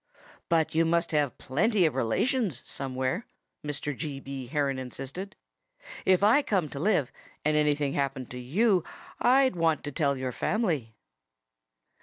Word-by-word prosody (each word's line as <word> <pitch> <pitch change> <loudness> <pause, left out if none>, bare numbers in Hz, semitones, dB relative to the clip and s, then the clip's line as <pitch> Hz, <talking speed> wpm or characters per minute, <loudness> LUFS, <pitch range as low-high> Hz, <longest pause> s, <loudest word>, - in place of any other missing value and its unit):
"But 165 -2 +2
you 165 +1 +4
must 170 +1 +1
have 145 -4 +1
plenty 190 - +2
of 155 - +2
relations 150 - 0
somewhere," 130 - -3 0.4
Mr. 145 -1 -3
G. 145 -1 -4
B. 135 -2 -7
Heron 140 0 0
insisted. 135 +9 -7 0.7
"If 190 +1 +4
I 225 +8 +6
came 200 -9 +1
here 155 - -7
to 140 - -6
live, 155 - +2 0.3
and 155 0 +3
anything 150 -2 +2
happened 135 -2 -2
to 125 - -6
you, 180 - +2 0.4
I'd 260 -3 +4
want 165 -3 +1
to 145 - -4
tell 140 -1 +1
your 130 -1 -3
family." 155 - -1
150 Hz, 150 wpm, -28 LUFS, 135-185 Hz, 0.7 s, I